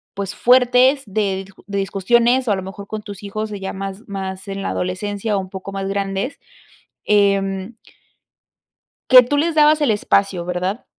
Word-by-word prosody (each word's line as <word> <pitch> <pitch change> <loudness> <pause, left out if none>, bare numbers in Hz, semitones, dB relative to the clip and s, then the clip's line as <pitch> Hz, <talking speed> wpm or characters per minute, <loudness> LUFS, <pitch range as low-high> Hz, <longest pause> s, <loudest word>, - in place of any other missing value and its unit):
pues 200 0 -4
fuertes 250 +3 +4
de 195 -2 -1
di 195 - -17 0.2
de 200 -1 -3
discusiones 235 +6 +2
o - - +2
a - - +3
lo 190 - -5
mejor 200 +1 -9
con 215 -1 -6
tus 205 -2 -9
hijos, 215 +2 -5
eh, 205 - -5
ya 190 - -5
más 195 +1 -6
más 190 0 -6
en 195 0 -5
la - - -2
adolescencia 205 +3 -2
o - - 0
un 185 -1 -6
poco 190 0 -7
más 195 0 -4
grandes, 195 +5 -3 0.7
em. 200 0 +1 1.4
Que 255 -1 +10
tú 290 +4 -1
les 325 +2 +1
dabas 305 0 +5
el 285 -6 +3
espacio, 195 -4 +1
¿verdad? 180 +5 -3
200 Hz, 180 wpm, -20 LUFS, 195-230 Hz, 1.4 s, Que